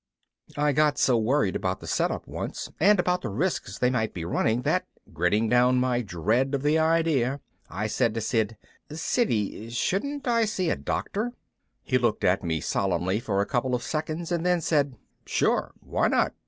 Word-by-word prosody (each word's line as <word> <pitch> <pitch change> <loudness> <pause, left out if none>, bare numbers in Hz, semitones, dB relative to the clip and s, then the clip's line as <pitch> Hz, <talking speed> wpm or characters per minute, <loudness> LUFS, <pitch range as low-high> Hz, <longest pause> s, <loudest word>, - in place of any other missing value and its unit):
I 150 0 +3
got 150 +1 +2
so 125 - +3
worried 110 -3 +1
about 95 -1 -1
the - - -10
set - - +1
up - - -5
once - - -5
and 200 +3 +5
about 180 0 +1
the 120 - -4
risks 125 - -2
they 125 0 +2
might 110 -5 -1
be 85 -2 -4
running 115 +7 0
that, - - +1 0.3
gritting 105 +7 +1
down 125 +2 +4
my 125 -1 +1
dread 115 - 0
of 135 - -3
the 150 +2 +3
idea, 160 -5 +2 0.3
I 100 +4 -3
said 115 +1 0
to 115 - -1
Sid, 110 -1 0 0.3
"Siddy, 115 - -1
shouldn't 265 - -2
I 230 -2 +3
see 185 -5 -1
a - - +1
doctor?" 225 +4 -3 0.5
He 130 - +1
looked 120 -3 0
at 90 +2 +2
me 80 -3 -1
solemnly 95 +1 0
for 105 -5 0
a - - 0
couple 125 +1 0
of 120 - -4
seconds 160 +2 -3
and 170 -1 0
then 180 -1 +2
said, 145 -4 +1 0.3
"Sure, - - +1
why - - 0
not? - - +2
125 Hz, 185 wpm, -26 LUFS, 110-160 Hz, 0.5 s, and